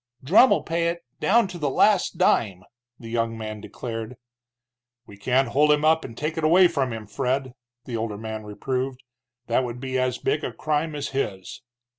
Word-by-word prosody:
"Drumm'll 200 Hz, -, +5 dB
pay 170 Hz, 0 st, 0 dB
it, 170 Hz, -2 st, -3 dB
down 230 Hz, 0 st, +3 dB
to 175 Hz, -, -8 dB
the 145 Hz, -3 st, 0 dB
last 200 Hz, +7 st, +3 dB
dime!" 95 Hz, -5 st, +2 dB, 0.4 s
the 115 Hz, -, -9 dB
young 115 Hz, -1 st, -1 dB
man 110 Hz, -1 st, -6 dB
declared. 115 Hz, +1 st, -6 dB, 0.9 s
"We 100 Hz, -, -13 dB
can't 125 Hz, +5 st, +1 dB
hold 150 Hz, +5 st, +4 dB
him 150 Hz, +1 st, +2 dB
up 160 Hz, +1 st, +4 dB
and 115 Hz, -2 st, -9 dB
take 155 Hz, +1 st, -2 dB
it -, -, -4 dB
away 175 Hz, +4 st, +6 dB
from 135 Hz, -5 st, -1 dB
him, 110 Hz, -1 st, -6 dB
Fred," 130 Hz, +2 st, -2 dB, 0.3 s
the 120 Hz, -3 st, -4 dB
older 110 Hz, -2 st, -3 dB
man 110 Hz, 0 st, -6 dB
reproved. 125 Hz, +5 st, -4 dB, 0.4 s
"That 120 Hz, +2 st, +1 dB
would 120 Hz, -1 st, -5 dB
be 130 Hz, 0 st, -2 dB
as 130 Hz, -1 st, 0 dB
big 150 Hz, -, -1 dB
a -, -, -2 dB
crime 155 Hz, 0 st, -1 dB
as 145 Hz, -1 st, -3 dB
his." 95 Hz, -9 st, -4 dB
130 Hz, 185 wpm, -24 LUFS, 115-155 Hz, 0.9 s, away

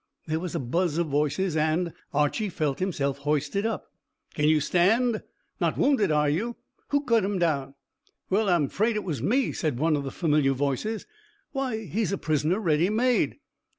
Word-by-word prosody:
There 160 Hz, 0 st, -1 dB
was 175 Hz, -2 st, -5 dB
a -, -, 0 dB
buzz 165 Hz, +6 st, 0 dB
of 170 Hz, -, +2 dB
voices, 150 Hz, +5 st, 0 dB
and 160 Hz, +2 st, +1 dB, 0.2 s
Archy 150 Hz, +9 st, +1 dB
felt 150 Hz, -6 st, -2 dB
himself 140 Hz, -7 st, -1 dB
hoisted 150 Hz, +8 st, 0 dB
up. 225 Hz, -, -5 dB, 0.4 s
"Can 150 Hz, 0 st, +2 dB
you 155 Hz, -1 st, +4 dB
stand? 215 Hz, -, +2 dB, 0.4 s
Not -, -, 0 dB
wounded, 260 Hz, -, +3 dB
are 150 Hz, 0 st, +3 dB
you? 210 Hz, +12 st, -1 dB, 0.3 s
Who 285 Hz, 0 st, +1 dB
cut 230 Hz, -5 st, +3 dB
him 200 Hz, 0 st, -1 dB
down?" 140 Hz, -6 st, 0 dB, 0.5 s
"Well, 200 Hz, +2 st, +1 dB
I'm 170 Hz, -6 st, +3 dB
'fraid 220 Hz, -, 0 dB
it 210 Hz, -, -1 dB
was 160 Hz, -7 st, -3 dB
me," 255 Hz, +6 st, +2 dB
said 150 Hz, -7 st, -2 dB
one 155 Hz, +3 st, +2 dB
of 145 Hz, -, -2 dB
the 135 Hz, -, -4 dB
familiar 150 Hz, -3 st, +2 dB
voices. 145 Hz, -, -2 dB, 0.5 s
"Why, 255 Hz, -6 st, -2 dB
he 200 Hz, +6 st, -2 dB
is 200 Hz, -, 0 dB
a 195 Hz, -, 0 dB
prisoner 155 Hz, +5 st, 0 dB
ready 170 Hz, -2 st, +2 dB
made." 245 Hz, +3 st, +1 dB
170 Hz, 185 wpm, -26 LUFS, 150-215 Hz, 0.5 s, you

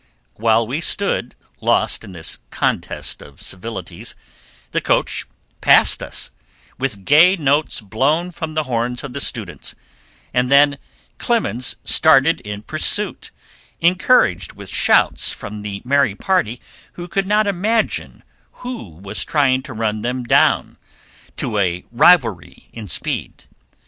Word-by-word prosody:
While 115 Hz, -, +2 dB
we 135 Hz, +8 st, -3 dB
stood, 185 Hz, -, -1 dB, 0.2 s
lost -, -, +1 dB
in -, -, -10 dB
this 85 Hz, -3 st, -6 dB
"contest -, -, -2 dB
of 70 Hz, -, -15 dB
civilities," 95 Hz, -2 st, -7 dB, 0.6 s
the -, -, 0 dB
coach -, -, 0 dB, 0.3 s
passed -, -, +4 dB
us, -, -, -4 dB, 0.5 s
with 115 Hz, -8 st, -3 dB
gay 170 Hz, +6 st, +6 dB
notes 145 Hz, -5 st, 0 dB
blown 140 Hz, -, 0 dB
from 160 Hz, -2 st, -6 dB
the 155 Hz, -, +1 dB
horns 125 Hz, -2 st, -2 dB
of 140 Hz, -3 st, -7 dB
the 140 Hz, -, -3 dB
students, 105 Hz, -, -3 dB, 0.6 s
and 125 Hz, 0 st, +1 dB
then 145 Hz, 0 st, +5 dB, 0.4 s
Clemens 120 Hz, +5 st, 0 dB
started 160 Hz, +1 st, +4 dB
in 105 Hz, 0 st, -7 dB
pursuit, 180 Hz, -, -1 dB, 0.5 s
encouraged 175 Hz, -, +3 dB
with -, -, -11 dB
shouts -, -, +3 dB
from 105 Hz, +1 st, -7 dB
the 100 Hz, -1 st, -6 dB
merry 135 Hz, -5 st, +2 dB
party 125 Hz, -, 0 dB, 0.3 s
who 175 Hz, 0 st, -8 dB
could 195 Hz, +2 st, -1 dB
not 210 Hz, +1 st, +3 dB
imagine 205 Hz, +4 st, -1 dB, 0.4 s
who 245 Hz, -, -6 dB
was 95 Hz, +6 st, -4 dB
trying 135 Hz, -4 st, +2 dB
to 130 Hz, -, -10 dB
run 110 Hz, -1 st, -2 dB
them 125 Hz, +2 st, -2 dB
down, 120 Hz, -, +2 dB, 0.6 s
to 110 Hz, -3 st, -2 dB
a 90 Hz, -2 st, -1 dB
rivalry 120 Hz, -, +3 dB
in 110 Hz, -2 st, -8 dB
speed. 80 Hz, -, -3 dB
125 Hz, 130 wpm, -19 LUFS, 105-160 Hz, 0.6 s, gay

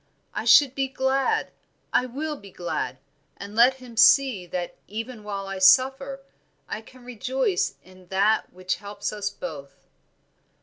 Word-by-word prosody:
I -, -, -3 dB
should 250 Hz, +3 st, +7 dB
be 270 Hz, 0 st, -1 dB
glad, 265 Hz, +1 st, 0 dB, 0.4 s
I 250 Hz, -, +3 dB
will 300 Hz, +5 st, -4 dB
be 200 Hz, -7 st, -13 dB
glad, 150 Hz, -8 st, -4 dB, 0.4 s
and 200 Hz, +1 st, -9 dB
let 245 Hz, +3 st, +6 dB
him 250 Hz, -3 st, -13 dB
see 230 Hz, -5 st, +5 dB
that 175 Hz, 0 st, -4 dB
even 225 Hz, +2 st, -6 dB
while 200 Hz, -1 st, -4 dB
I 195 Hz, 0 st, -5 dB
suffer 270 Hz, +7 st, +4 dB, 0.5 s
I -, -, -5 dB
can 250 Hz, +2 st, -17 dB
rejoice 250 Hz, -, -1 dB
in 185 Hz, 0 st, -18 dB
that 200 Hz, +4 st, +1 dB
which 185 Hz, 0 st, -3 dB
helps 205 Hz, 0 st, -5 dB
us 205 Hz, -1 st, -2 dB
both." 145 Hz, -8 st, -9 dB
220 Hz, 145 wpm, -25 LUFS, 190-260 Hz, 0.5 s, should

